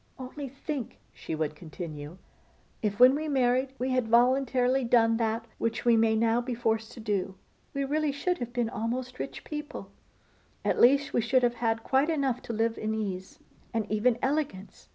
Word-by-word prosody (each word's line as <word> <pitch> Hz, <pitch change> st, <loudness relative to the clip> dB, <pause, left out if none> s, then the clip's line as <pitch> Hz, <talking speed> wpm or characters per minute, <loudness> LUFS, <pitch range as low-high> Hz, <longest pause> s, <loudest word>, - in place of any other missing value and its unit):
'Only 265 Hz, +2 st, -7 dB
think,' 275 Hz, -1 st, -5 dB, 0.2 s
she -, -, -5 dB
would 155 Hz, -1 st, -2 dB
continue, 155 Hz, -1 st, -8 dB, 0.6 s
'if 210 Hz, 0 st, -1 dB
when 250 Hz, +1 st, +8 dB
we 310 Hz, +2 st, -2 dB
married 260 Hz, -1 st, +1 dB
we 260 Hz, +1 st, -1 dB
had 255 Hz, -3 st, +1 dB
voluntarily 255 Hz, +2 st, +3 dB
done 230 Hz, -1 st, +4 dB
that 225 Hz, 0 st, -1 dB
which 230 Hz, +1 st, -2 dB
we 235 Hz, -1 st, +6 dB
may 225 Hz, 0 st, +3 dB
now 230 Hz, +1 st, +2 dB
be 245 Hz, 0 st, -4 dB
forced 225 Hz, -1 st, -1 dB
to -, -, -11 dB
do, 200 Hz, -3 st, -2 dB, 0.4 s
we 275 Hz, -, 0 dB
really 300 Hz, +2 st, 0 dB
should 355 Hz, +6 st, -1 dB
have 240 Hz, -1 st, -4 dB
been 240 Hz, -1 st, 0 dB
almost 245 Hz, +4 st, -4 dB
rich -, -, -5 dB
people; 300 Hz, -1 st, -7 dB, 0.7 s
at -, -, +1 dB
least 275 Hz, +3 st, +5 dB
we -, -, +3 dB
should 250 Hz, +3 st, +2 dB
have 240 Hz, -1 st, +3 dB
had 225 Hz, -1 st, 0 dB
quite 270 Hz, +4 st, +2 dB
enough 275 Hz, -6 st, 0 dB
to -, -, -6 dB
live 225 Hz, +1 st, 0 dB
in 220 Hz, 0 st, -1 dB
ease, 190 Hz, -4 st, -4 dB, 0.4 s
and 225 Hz, -2 st, +1 dB
even 225 Hz, +3 st, +2 dB
elegance. 265 Hz, -9 st, -2 dB
240 Hz, 180 wpm, -28 LUFS, 220-265 Hz, 0.7 s, when